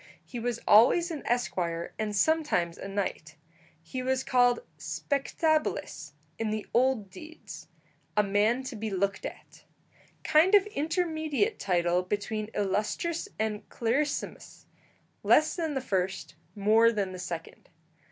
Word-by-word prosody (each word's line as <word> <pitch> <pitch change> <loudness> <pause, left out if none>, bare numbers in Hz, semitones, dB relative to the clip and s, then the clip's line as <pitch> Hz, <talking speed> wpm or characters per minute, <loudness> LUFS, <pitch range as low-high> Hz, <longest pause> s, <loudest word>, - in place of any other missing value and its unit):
He 245 - -6
was 235 0 -2
always 290 - +6
an 310 - -4
esquire, 175 -8 -1
and 210 -1 -2
sometimes 295 - +1
a - - -6
knight. 195 -6 -3 0.5
He 255 +10 -5
was 260 +1 0
called 245 -1 +3 0.2
spectabilis 280 - -1 0.3
in 225 -1 -1
the 215 0 -3
old 240 -5 +2
deeds, 320 - -11 0.5
"a 210 - +5
man 210 +6 +2
to 260 -1 -6
be 220 0 -4
looked 195 0 -1
at" - - -13 0.6
kind 340 +7 +5
of 400 -1 +6
intermediate 325 - -1
title 175 -1 +1
between 205 +3 -3
illustris 210 - -1
and 215 -1 -3
clarissimus; 275 +6 -2 0.6
less 310 - +4
than 320 -4 -2
the 265 - -1
first, 190 -7 -2 0.2
more 220 +3 +4
than 200 -4 -2
the 185 - -8
second. 170 -2 -7
225 Hz, 130 wpm, -28 LUFS, 195-295 Hz, 0.6 s, always